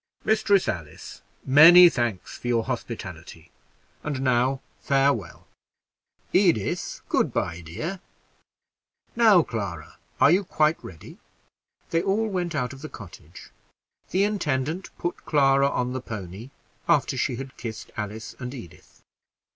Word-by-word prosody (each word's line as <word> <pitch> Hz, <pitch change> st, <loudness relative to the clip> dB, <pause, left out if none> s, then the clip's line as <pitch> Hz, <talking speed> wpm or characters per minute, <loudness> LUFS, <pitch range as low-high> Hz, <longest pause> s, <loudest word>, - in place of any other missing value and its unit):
"Mistress 215 Hz, -3 st, +3 dB
Alice, 80 Hz, -4 st, -6 dB, 0.2 s
many 165 Hz, +6 st, +9 dB
thanks 120 Hz, -, -2 dB
for -, -, -8 dB
your 115 Hz, -2 st, +1 dB
hospitality; 90 Hz, -9 st, -7 dB, 0.5 s
and 145 Hz, -3 st, -4 dB
now, 130 Hz, +1 st, +2 dB, 0.2 s
farewell. 135 Hz, -10 st, 0 dB, 0.9 s
Edith, 175 Hz, -, +1 dB
good -, -, +1 dB
by, 85 Hz, +1 st, -2 dB
dear. 155 Hz, -, -6 dB, 1.2 s
Now, 220 Hz, -7 st, +6 dB
Clara, 95 Hz, -, -6 dB, 0.2 s
are 145 Hz, -, +6 dB
you 190 Hz, +4 st, +3 dB
quite 155 Hz, -3 st, +1 dB
ready?" 85 Hz, -4 st, -12 dB, 0.7 s
They 165 Hz, -, +2 dB
all 210 Hz, +4 st, 0 dB
went 180 Hz, -5 st, -3 dB
out 125 Hz, -2 st, -2 dB
of 135 Hz, -, -12 dB
the 155 Hz, -, -7 dB
cottage. 90 Hz, -5 st, -13 dB, 0.6 s
The 190 Hz, +2 st, +2 dB
intendant 170 Hz, -4 st, -1 dB
put 175 Hz, -, -4 dB
Clara 140 Hz, -2 st, +3 dB
on 125 Hz, -2 st, -2 dB
the 130 Hz, -, -4 dB
pony, 105 Hz, 0 st, -8 dB, 0.4 s
after 150 Hz, -4 st, +2 dB
she 125 Hz, 0 st, -1 dB
had 130 Hz, +1 st, -8 dB
kissed 115 Hz, -2 st, -8 dB
Alice 105 Hz, +1 st, -6 dB
and 125 Hz, +1 st, -6 dB
Edith. 90 Hz, -10 st, -13 dB
130 Hz, 125 wpm, -25 LUFS, 110-170 Hz, 1.2 s, many